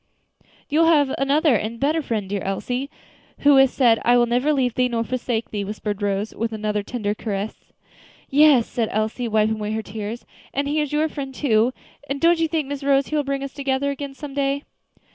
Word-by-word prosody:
"You 315 +3 +3
have 290 -5 +4
another 280 0 +3
and 220 +2 -2
a - - -12
better 300 +6 +1
friend, 220 -8 -3
dear 200 0 -3
Elsie, 245 +8 -3 0.5
who 285 -1 +6
has 270 -1 +6
said, 235 -4 +3
'I 245 +1 +5
will 240 - +4
never 250 +5 +1
leave 260 -5 +1
thee, 250 +1 +2
nor 230 -2 -1
forsake 240 -2 -3
thee,'" 205 -2 -2
whispered 210 0 -4
Rose, 205 +1 -1
with 230 0 -3
another 210 -1 -2
tender 205 -1 -3
caress. 210 -1 -5 0.6
"Yes," 285 -4 +5
said 230 -3 -2
Elsie, 220 +3 -1
wiping 220 0 +1
away 210 0 -3
her 220 0 -2
tears; 215 +3 -6 0.3
"and 280 +1 0
He 300 +2 +1
is 295 - -3
your 300 +1 +2
Friend, 280 -3 -6
too; 235 -3 +2 0.4
and 275 0 -2
don't 335 +1 +4
you 325 - +2
think, 310 -3 -1
Miss 285 0 -5
Rose, 275 0 +2
He 310 - -2
will 295 - +1
bring 275 0 -2
us 275 - -6
together 275 0 -1
again 280 0 -6
some 290 -1 -8
day?" 280 0 0
255 Hz, 210 wpm, -22 LUFS, 220-280 Hz, 0.6 s, who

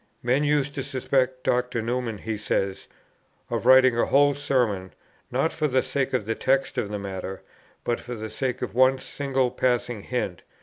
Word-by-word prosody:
"Men 130 +4 +2
used 145 -1 +1
to 135 - -3
suspect 130 -1 0
Dr. 125 -1 0
Newman," 115 -1 -2
he 110 +2 -4
says, 100 -2 -2 0.6
"of - - -1
writing 130 -1 +7
a - - +3
whole 145 +1 +4
Sermon, 125 -10 0 0.4
not 135 +6 0
for 155 -1 0
the 130 -2 +2
sake 130 0 -1
of 125 -5 0
the 115 - 0
text 135 +3 +1
or - - +3
of 100 - -5
the 105 - -3
matter, 95 -1 -6 0.4
but 120 - -1
for 120 0 -7
the 110 -1 -6
sake 125 +3 -2
of - - -4
one 130 +2 +5
single 135 -1 -1
passing 125 -3 0
hint 100 -7 -3
125 Hz, 185 wpm, -25 LUFS, 110-135 Hz, 0.6 s, writing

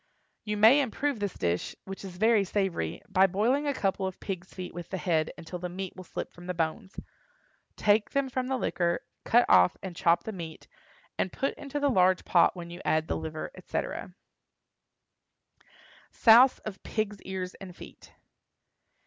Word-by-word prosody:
You 210 -1 -2
may 225 +7 +7
improve 275 0 -1
this 205 -3 -3
dish, 85 0 -2
which 195 +1 -8
is 185 -2 -8
very 220 +1 +4
savory, 190 - -2
by 195 -1 +4
boiling 235 +10 +1
a 285 - +1
couple 195 -2 0
of 190 - -7
pigs' 185 -2 -6
feet 185 -1 -7
with 175 -1 -8
the 190 - -3
head 160 -4 +1
until 175 +2 -7
the 180 0 -4
meat 190 +1 -6
will 185 - -9
slip - - -6
from 175 0 -13
the 180 - -3
bones. 170 +5 -3 0.8
Take 210 0 +3
them 275 -1 0
from 255 0 -2
the 265 0 0
liquor, 170 -7 0 0.2
cut 240 +1 +5
off 90 - +5
and 185 -3 -6
chop 170 0 +3
the 220 - -5
meat, 165 -5 -8 0.5
and 185 - 0
put 275 - -1
into 285 0 -5
the 285 0 +2
large 185 -3 +3
pot 170 0 +4
when 170 -1 -8
you 175 +2 -8
add 155 0 +1
the - - -1
liver, 160 -1 -5
etc. - - -5 1.9
SOUSE 240 +3 +6
OF 210 -3 -6
PIGS' 210 -2 -3
EARS 185 -1 -4
AND 185 -2 -9
FEET. - - -13
190 Hz, 175 wpm, -28 LUFS, 175-220 Hz, 1.9 s, may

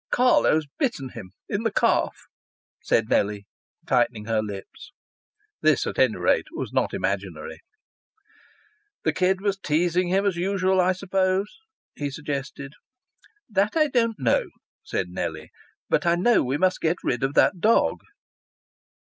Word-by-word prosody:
"Carlo's 245 -11 +3
bitten 230 - -1
him 110 -6 -10 0.2
in 205 - -2
the 225 - +1
calf," - - +1 0.6
said 115 - +1
Nellie, 100 -1 0 0.4
tightening 120 -4 +1
her 110 -1 +1
lips. 105 - -8 0.7
This, - - +3
at - - -4
any - - +4
rate, - - +1
was - - -5
not - - +1
imaginary. - - -3 1.4
"The - - +1
kid 185 +1 +1
was 200 -1 -1
teasing 175 +2 +1
him 195 +3 +1
as 195 -4 0
usual, 190 +1 +1
I 185 +1 +3
suppose?" 190 +1 -1 0.4
he 145 -1 -4
suggested. 140 -1 -5 0.7
"That 205 +4 0
I 305 -1 +3
don't 230 -4 +1
know," - - +1 0.3
said 445 - -3
Nellie. - - -5 0.4
"But 175 - +1
I 170 - +4
know 220 +7 +3
we 130 +3 -1
must 185 +3 +1
get 165 +2 +1
rid 120 - -1
of 135 +1 -1
that 185 - +4
dog." 225 +5 +2
180 Hz, 140 wpm, -24 LUFS, 135-200 Hz, 1.4 s, any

